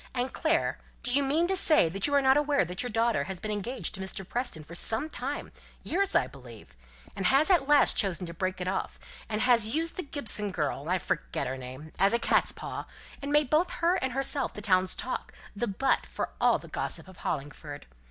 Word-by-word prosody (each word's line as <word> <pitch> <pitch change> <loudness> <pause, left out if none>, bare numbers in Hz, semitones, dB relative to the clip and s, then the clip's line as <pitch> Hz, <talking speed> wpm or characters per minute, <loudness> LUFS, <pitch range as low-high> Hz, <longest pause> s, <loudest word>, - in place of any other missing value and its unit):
"And, 250 +1 -1
Clare, 330 0 +1 0.2
do 245 - -1
you 285 - +4
mean 300 +5 +2
to 385 - +1
say 310 - +5
that 190 +4 -1
you 285 - +1
are 280 - +4
not 265 0 +5
aware 290 -6 +2
that 180 +2 -4
your 245 - -3
daughter 225 -8 +1
has 190 -2 -4
been 215 - -4
engaged 215 +5 -3
to 190 - -4
Mr. 190 0 -5
Preston 240 -11 -3
for 155 - -12
some 225 - -1
time 280 0 -5 0.3
years, 395 +3 0
I - - +4
believe, 125 -5 -13 0.4
and 195 - 0
has 275 - +4
at 315 -7 +4
last 295 -1 +5
chosen 190 -2 +1
to 170 - -7
break 185 +2 -2
it 180 - -3
off, 190 +1 -2 0.3
and 215 0 -1
has 235 -2 +4
used 330 +1 -1
the - - -1
Gibson 235 - +1
girl 150 -5 -2
I 185 - +3
forget 175 - -2
her 130 - -3
name 130 +4 -9
as 195 +2 +4
a - - +5
cat's - - +2
paw, - - -6 0.3
and 280 +1 -4
made 295 -3 +3
both 320 +4 +3
her 340 +1 +1
and 260 -7 -2
herself 270 +1 0
the - - -6
town's 185 -3 +2
talk - - -4 0.2
the 240 +4 -1
butt 270 +8 +1
for - - -4
all - - +5
the - - -12
gossip - - -3
of 185 -2 -14
Hollingford? 145 0 -5
225 Hz, 220 wpm, -29 LUFS, 185-285 Hz, 0.4 s, say